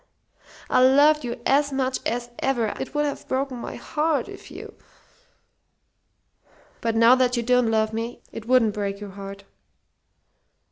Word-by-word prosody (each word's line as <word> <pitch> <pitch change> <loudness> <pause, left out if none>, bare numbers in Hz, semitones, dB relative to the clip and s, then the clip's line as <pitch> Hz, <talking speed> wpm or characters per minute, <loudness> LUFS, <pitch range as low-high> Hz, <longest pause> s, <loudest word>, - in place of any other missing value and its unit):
I - - +3
loved 290 +3 +5
you 235 -1 -5
as 285 +1 +2
much 265 -1 -1
as 240 +1 -3
ever. 240 -5 0
It 265 - -6
would 295 0 +1
have 285 - -5
broken 260 -1 -2
my - - -6
heart 305 0 -1
if - - -11
you - - -10 1.4
" - - -34
"But 230 -1 -1
now 230 +2 +6
that 255 -1 +2
you 235 - 0
don't 250 -1 +3
love 220 0 +1
me, 230 +2 -5
it 225 0 -9
wouldn't 240 -4 +3
break 200 -1 -3
your 205 -1 -8
heart." 195 0 -9
245 Hz, 155 wpm, -24 LUFS, 225-270 Hz, 1.4 s, now